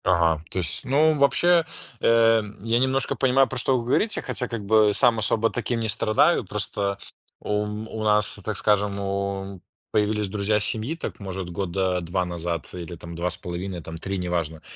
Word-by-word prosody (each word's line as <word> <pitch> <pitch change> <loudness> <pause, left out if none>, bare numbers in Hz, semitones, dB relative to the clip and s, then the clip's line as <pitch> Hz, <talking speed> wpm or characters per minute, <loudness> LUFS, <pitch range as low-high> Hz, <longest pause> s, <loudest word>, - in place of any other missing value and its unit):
Ага, 80 -2 +2
то - - -6
есть, 85 -4 -1
ну, 150 +4 +4
вообще, 165 +4 +4 0.4
э, 115 -1 +4 0.2
я 115 +1 +2
немножко 130 0 +1
понимаю, 130 0 +3
про 130 - -5
что 130 +1 +2
вы 120 - -3
говорите, 210 - +1
хотя 125 - -2
как 115 -4 -5
бы 105 0 +4
сам 120 -4 +4
особо 110 +1 +1
таким 120 -1 -2
не 110 -1 -2
страдаю. 110 - +3
Просто 100 0 -2 0.4
у 105 0 -1
у 110 +1 -5
нас, 105 0 +2
так 105 0 -3
скажем, 105 -1 +1
у 100 -1 -3 0.3
появились 105 -1 +1
друзья 105 +1 0
семьи, 110 +8 -2
так, 165 - -6
может, 95 -2 -5
года 90 0 -1
2 90 +2 -1
назад 85 -2 -4
или 85 -1 -7
там 85 +1 -10
2 85 +2 -2
с 90 - -4
половиной 90 +1 -5
там, 80 +1 -7
3, 95 +4 -4
неважно. 85 -3 -2
105 Hz, 180 wpm, -24 LUFS, 90-115 Hz, 0.4 s, ну